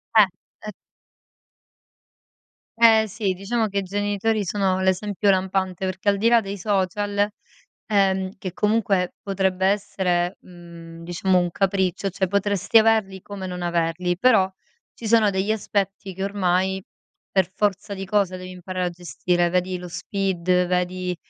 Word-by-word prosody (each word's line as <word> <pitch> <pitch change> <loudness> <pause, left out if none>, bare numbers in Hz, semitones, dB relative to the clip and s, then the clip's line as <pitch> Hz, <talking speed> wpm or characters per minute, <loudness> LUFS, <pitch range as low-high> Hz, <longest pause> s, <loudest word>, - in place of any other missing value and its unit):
Eh! 215 -2 +8 0.4
Ehm 210 - -4 2.1
Eh 220 -1 +6
sì, 200 -2 -2
diciamo 215 +4 -1
che 200 0 -1
i - - -3
genitori 205 +2 -1
sono 190 -1 0
l'esempio 200 +2 +1
lampante, 190 -1 0
perché 185 +2 -1
al 200 - +2
di 230 +3 +3
là 235 -1 +6
dei 200 -1 -5
social, 205 +1 0 0.6
ehm, 190 -2 +2
che 185 -3 -5
comunque 205 -3 +1
potrebbe 190 -1 0
essere, 190 -3 0
mhmm, 170 -2 -12
diciamo 180 +2 +1
un 175 -1 0
capriccio, 190 0 0
cioè 190 +1 -1
potresti 200 +3 +2
averli 215 -4 +2
come 195 -2 -7
non 180 -1 -5
averli, 175 +1 0
però 215 -6 +4 0.4
ci 230 - -8
sono 220 -2 +4
degli 195 +3 0
aspetti 195 -2 -2
che 190 +1 -3
ormai 190 -1 0 0.5
per 190 -2 +2
forza 205 0 -1
di 195 0 -5
cosa 195 -2 +1
devi 185 0 -8
imparare 185 0 -4
a - - -1
gestire, 175 0 -1
vedi 180 0 0
lo 180 - -8
SPID, 180 0 0
vedi, 180 0 -1
190 Hz, 145 wpm, -23 LUFS, 180-205 Hz, 2.1 s, Eh